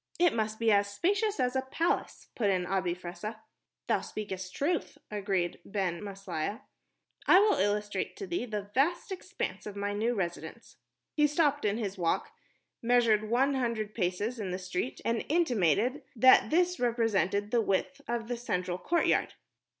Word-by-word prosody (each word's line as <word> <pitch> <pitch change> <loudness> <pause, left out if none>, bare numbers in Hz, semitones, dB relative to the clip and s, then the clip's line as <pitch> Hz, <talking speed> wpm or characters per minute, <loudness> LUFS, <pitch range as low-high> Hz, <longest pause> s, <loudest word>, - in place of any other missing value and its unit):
"It 350 -2 +4
must 220 -1 -1
be 230 -1 +2
as 200 0 +3
spacious 405 - 0
as 250 0 +1
a 265 - +2
palace," 325 +6 -2
put 210 -4 +1
in 185 -2 +1
Abi 185 -1 0
Fressah. 210 +5 -7 0.4
"Thou - - +1
speakest 190 -3 -6
truth," 330 +4 -1
agreed 195 -4 -1
Ben 190 -3 -2
Maslia. 195 -1 -4 0.7
"I 360 - +8
will 415 +2 +4
illustrate 205 - -1
to 405 - -5
thee 350 -8 -2
the 205 -2 -5
vast 340 - +1
expanse 375 - -4
of 205 - -7
my 205 0 -2
new 225 +4 0
residence." 175 -4 -5 0.4
He 300 -1 +4
stopped 290 -2 +1
in 205 +1 +1
his 200 -4 -4
walk, 165 -1 0 0.5
measured 230 -3 +3
one 265 +4 +3
hundred 230 -5 -1
paces 205 +5 -1
in 200 -3 -3
the 180 - -2
street, 185 +6 -4
and 230 0 0
intimated 255 - +2
that 255 +3 +6
this 360 +2 +2
represented 215 -4 +1
the 235 - +3
width 220 +7 -1
of 235 -1 -2
the 245 0 -2
central 180 -6 -2
courtyard. 340 - +1
220 Hz, 160 wpm, -30 LUFS, 195-265 Hz, 0.7 s, I